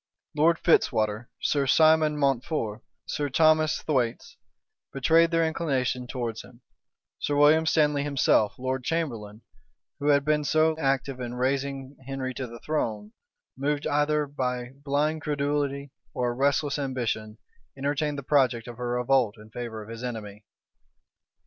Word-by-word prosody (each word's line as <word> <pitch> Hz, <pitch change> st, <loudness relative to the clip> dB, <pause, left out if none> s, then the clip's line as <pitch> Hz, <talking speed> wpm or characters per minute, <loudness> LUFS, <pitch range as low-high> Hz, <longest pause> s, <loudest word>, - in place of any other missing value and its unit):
Lord 165 Hz, +3 st, +4 dB
Fitzwater, 110 Hz, -9 st, +1 dB
Sir 140 Hz, -2 st, +1 dB
Simon 155 Hz, +1 st, +4 dB
Mountfort, 130 Hz, -5 st, -1 dB, 0.2 s
Sir 145 Hz, -1 st, -2 dB
Thomas 155 Hz, +2 st, +3 dB
Thwaites, 125 Hz, -6 st, -1 dB, 0.6 s
betrayed 165 Hz, +5 st, +4 dB
their 165 Hz, -1 st, +2 dB
inclination 130 Hz, -6 st, -1 dB
towards 120 Hz, -3 st, -4 dB
him: 120 Hz, 0 st, -17 dB, 0.6 s
Sir 145 Hz, -, -1 dB
William 155 Hz, +2 st, +5 dB
Stanley 150 Hz, -3 st, +3 dB
himself, 135 Hz, -6 st, +2 dB
lord 130 Hz, 0 st, -3 dB
chamberlain, 120 Hz, -10 st, -3 dB, 0.6 s
who 145 Hz, -, -2 dB
had 140 Hz, -1 st, +4 dB
been 150 Hz, 0 st, +2 dB
so 155 Hz, +2 st, +2 dB
active 135 Hz, -2 st, 0 dB
in 120 Hz, -1 st, -5 dB
raising 135 Hz, +1 st, -2 dB
Henry 135 Hz, -1 st, -3 dB
to 130 Hz, 0 st, -5 dB
the 120 Hz, 0 st, -10 dB
throne, 110 Hz, -9 st, -3 dB, 0.4 s
moved 145 Hz, +2 st, -1 dB
either 150 Hz, +1 st, +1 dB
by 125 Hz, -3 st, -3 dB
blind 150 Hz, +2 st, 0 dB
credulity 145 Hz, -1 st, -2 dB, 0.2 s
or 125 Hz, -1 st, 0 dB
a -, -, -6 dB
restless 140 Hz, +2 st, +1 dB
ambition, 115 Hz, -5 st, -3 dB, 0.4 s
entertained 145 Hz, +2 st, -1 dB
the 140 Hz, -, -5 dB
project 130 Hz, -4 st, +2 dB
of 120 Hz, 0 st, -9 dB
a -, -, -4 dB
revolt 120 Hz, -2 st, +1 dB
in 105 Hz, +1 st, -15 dB
favor 110 Hz, -2 st, -6 dB
of 105 Hz, -, -14 dB
his 115 Hz, +1 st, -8 dB
enemy. 105 Hz, -4 st, -6 dB
135 Hz, 140 wpm, -26 LUFS, 120-150 Hz, 0.6 s, William